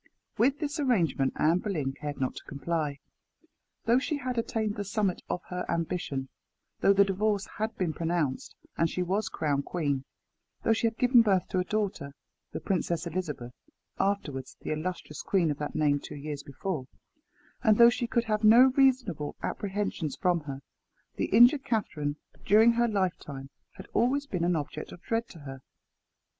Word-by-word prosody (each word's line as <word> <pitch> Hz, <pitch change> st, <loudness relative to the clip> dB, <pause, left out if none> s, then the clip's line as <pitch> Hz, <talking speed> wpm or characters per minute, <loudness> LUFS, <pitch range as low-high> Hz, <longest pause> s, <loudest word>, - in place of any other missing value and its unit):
With 260 Hz, +6 st, +3 dB
this 300 Hz, 0 st, -3 dB
arrangement 175 Hz, -, +1 dB
Anne 165 Hz, +4 st, +3 dB
Boleyn 155 Hz, -10 st, -2 dB
cared 145 Hz, 0 st, -6 dB
not 130 Hz, -1 st, -1 dB
to -, -, -9 dB
comply. 145 Hz, 0 st, -2 dB, 0.9 s
Though 235 Hz, +2 st, +4 dB
she 285 Hz, +2 st, -2 dB
had 255 Hz, -2 st, -3 dB
attained 220 Hz, -2 st, -1 dB
the 205 Hz, -, -3 dB
summit 200 Hz, -1 st, -1 dB
of 180 Hz, -, -2 dB
her 180 Hz, 0 st, -3 dB
ambition; 160 Hz, -5 st, -2 dB, 0.5 s
though -, -, +5 dB
the 200 Hz, 0 st, +5 dB
divorce 205 Hz, +1 st, 0 dB
had 220 Hz, +1 st, -2 dB
been 175 Hz, -4 st, -1 dB
pronounced, 165 Hz, -5 st, -2 dB, 0.2 s
and 165 Hz, -, +2 dB
she 180 Hz, -, -1 dB
was 195 Hz, +4 st, -1 dB
crowned 145 Hz, -3 st, -1 dB
queen; 145 Hz, -6 st, -1 dB, 0.6 s
though 225 Hz, -, +4 dB
she 225 Hz, +1 st, +1 dB
had 225 Hz, 0 st, -4 dB
given 250 Hz, -1 st, +6 dB
birth 195 Hz, -5 st, +2 dB
to 185 Hz, -, 0 dB
a -, -, +2 dB
daughter 185 Hz, -9 st, -2 dB, 0.4 s
the -, -, -4 dB
Princess 175 Hz, -3 st, -1 dB
Elizabeth, 150 Hz, -8 st, -4 dB, 0.5 s
afterwards 145 Hz, -10 st, -2 dB
the -, -, -4 dB
illustrious 155 Hz, -1 st, -4 dB
queen 175 Hz, -6 st, +1 dB
of 145 Hz, -, -5 dB
that 150 Hz, -, -4 dB
name 145 Hz, -2 st, +2 dB
two -, -, -9 dB
years 145 Hz, 0 st, -5 dB
before; 140 Hz, -1 st, -4 dB, 0.7 s
and 220 Hz, -4 st, +4 dB
though 235 Hz, 0 st, +8 dB
she 240 Hz, 0 st, -2 dB
could 235 Hz, 0 st, +1 dB
have 215 Hz, -1 st, -1 dB
no 245 Hz, +4 st, +7 dB
reasonable 250 Hz, -, +2 dB
apprehensions 195 Hz, -6 st, -2 dB
from 180 Hz, -3 st, +1 dB
her, 135 Hz, -1 st, -6 dB, 0.6 s
the -, -, +1 dB
injured 245 Hz, +6 st, +6 dB
Catherine, 175 Hz, -, -1 dB, 0.3 s
during 220 Hz, +3 st, +6 dB
her 235 Hz, +1 st, +2 dB
lifetime, 170 Hz, -10 st, -2 dB, 0.2 s
had 190 Hz, -, -11 dB
always 265 Hz, +5 st, +2 dB
been 180 Hz, -11 st, -2 dB
an 175 Hz, 0 st, +2 dB
object 150 Hz, 0 st, -4 dB
of 175 Hz, -, -12 dB
dread 230 Hz, +1 st, -1 dB
to 165 Hz, -, -12 dB
her. 135 Hz, -2 st, -8 dB
185 Hz, 170 wpm, -29 LUFS, 150-225 Hz, 0.9 s, though